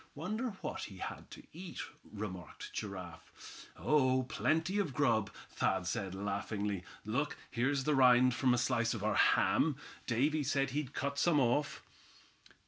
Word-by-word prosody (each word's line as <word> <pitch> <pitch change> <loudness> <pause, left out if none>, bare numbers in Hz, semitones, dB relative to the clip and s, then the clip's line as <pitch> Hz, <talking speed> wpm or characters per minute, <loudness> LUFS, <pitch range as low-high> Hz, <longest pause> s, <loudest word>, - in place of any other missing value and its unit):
"Wonder 215 - -2
what - - -4
he 95 - -10
had - - -6
to - - -11
eat?" 175 +1 -7 0.3
remarked 95 -5 -7
Giraffe. 95 -5 -8
"Oh! 130 -3 +3
plenty 160 +9 0
of 155 -11 -1
grub," 115 -8 +2 0.2
Thad 95 -2 0
said, 95 +1 -2
laughingly. 100 0 -2 0.2
"Look, - - -1
here's 135 +4 +1
the 150 - +2
rind 125 -2 +6
from 130 0 +2
a - - -1
slice 120 -1 +1
of 105 - -5
our 110 0 +2
ham. 150 +6 +4 0.3
Davy 145 +6 +2
said 135 0 +1
he'd 145 -1 -3
cut 140 0 -2
some 165 -4 +4
off." 140 +3 +1
130 Hz, 145 wpm, -34 LUFS, 105-145 Hz, 0.3 s, rind